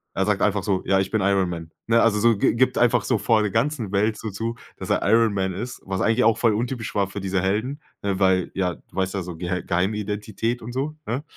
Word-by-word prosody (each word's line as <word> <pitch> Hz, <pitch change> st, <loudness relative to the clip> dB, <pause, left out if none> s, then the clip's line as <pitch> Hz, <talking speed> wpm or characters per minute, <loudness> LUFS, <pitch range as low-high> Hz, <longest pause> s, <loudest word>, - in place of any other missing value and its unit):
er 95 Hz, -, +1 dB
sagt 100 Hz, -1 st, +1 dB
einfach 100 Hz, -2 st, +1 dB
so: 95 Hz, -1 st, 0 dB
„Ja, 95 Hz, 0 st, +3 dB
ich 95 Hz, -, -4 dB
bin 110 Hz, -, +1 dB
Iron 95 Hz, -2 st, +2 dB
Man", 85 Hz, -2 st, -6 dB, 0.2 s
ne? 115 Hz, 0 st, +4 dB
Also 115 Hz, -2 st, +3 dB
so 115 Hz, -1 st, +4 dB
gi -, -, +2 dB
gibt 125 Hz, +1 st, +2 dB
einfach 120 Hz, -1 st, +3 dB
so 120 Hz, -, +1 dB
vor 110 Hz, +2 st, +2 dB
der 105 Hz, -, -1 dB
ganzen 115 Hz, -2 st, -1 dB
Welt 105 Hz, +2 st, +1 dB
so 110 Hz, -, -5 dB
zu, 115 Hz, +4 st, -3 dB, 0.2 s
dass -, -, -7 dB
er -, -, +2 dB
Iron 115 Hz, -1 st, +4 dB
Man 95 Hz, -1 st, 0 dB
ist, 120 Hz, +7 st, -6 dB
was 95 Hz, -1 st, -3 dB
eigentlich 115 Hz, +3 st, +3 dB
auch 115 Hz, 0 st, +4 dB
voll 115 Hz, -2 st, +3 dB
untypisch 120 Hz, 0 st, -3 dB
war 100 Hz, -1 st, +2 dB
für 100 Hz, +1 st, -6 dB
diese 95 Hz, -1 st, -1 dB
Helden, 110 Hz, -, -1 dB, 0.2 s
ne, 100 Hz, -2 st, -1 dB
weil 95 Hz, -2 st, +2 dB
ja 90 Hz, -3 st, 0 dB
du -, -, -23 dB
weißt 95 Hz, +1 st, -1 dB
ja, 95 Hz, -, -1 dB
so 85 Hz, -1 st, -7 dB
Geh 90 Hz, +2 st, -3 dB
Geheimidentität 105 Hz, +5 st, -2 dB
und 115 Hz, +2 st, -7 dB
so, 140 Hz, +4 st, -2 dB
ne? 125 Hz, +6 st, -2 dB
105 Hz, 255 wpm, -23 LUFS, 95-115 Hz, 0.2 s, ne